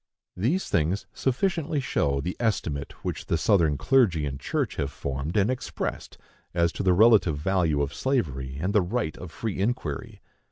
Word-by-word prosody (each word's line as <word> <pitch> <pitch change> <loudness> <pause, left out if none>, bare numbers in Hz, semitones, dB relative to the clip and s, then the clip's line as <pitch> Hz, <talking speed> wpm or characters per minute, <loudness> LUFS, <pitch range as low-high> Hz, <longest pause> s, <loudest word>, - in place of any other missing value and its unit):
These 135 - 0
things 85 +5 0
sufficiently 155 +3 0
show 70 - 0
the 90 +5 -3
estimate 85 -11 -1
which - - -4
the 85 - +1
Southern 80 -6 +3
clergy 105 - +3
and 70 -1 -4
church - - -2
have 70 0 -1
formed 70 +5 -3
and 105 +4 +3
expressed 130 - -4 0.4
as 85 -1 +3
to - - -5
the 95 -2 +4
relative 100 -6 +5
value 80 -3 +1
of 70 +1 -4
slavery 70 - -1
and 95 +6 -1
the 105 - +5
right 90 -2 -2
of 90 - -7
free 105 +2 -4
inquiry. 95 - -2
90 Hz, 165 wpm, -26 LUFS, 75-115 Hz, 0.4 s, relative